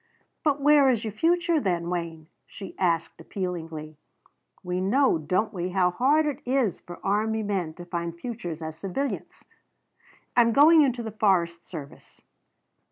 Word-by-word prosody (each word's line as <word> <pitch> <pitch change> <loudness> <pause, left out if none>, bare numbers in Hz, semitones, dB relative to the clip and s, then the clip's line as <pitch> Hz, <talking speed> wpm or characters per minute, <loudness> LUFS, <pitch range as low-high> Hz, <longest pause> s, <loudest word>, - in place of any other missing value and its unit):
"But 295 -2 +1
where 285 -1 +5
is 235 -3 +1
your 215 -2 -4
future 340 +5 +2
then, 175 -8 -1
Wayne?" 165 -3 -4 0.2
she 195 -3 -10
asked 165 -3 0
appealingly. 165 -5 -5 0.7
"We 180 0 -2
know, 230 - +3
don't 185 +8 -1
we, 180 -1 -3
how 180 -1 +2
hard 285 - +3
it 295 -1 -3
is 250 -6 0
for 175 - -10
army 220 +2 0
men 185 -6 -2
to 175 - -10
find 170 -1 -4
futures 175 -8 -6
as 160 0 -5
civilians?" 200 - -5 0.9
"I'm 230 -1 +4
going 310 +4 +7
into 250 -4 +1
the 220 - -5
forest 180 -5 +1
service." 150 -5 -10
195 Hz, 150 wpm, -26 LUFS, 170-255 Hz, 0.9 s, going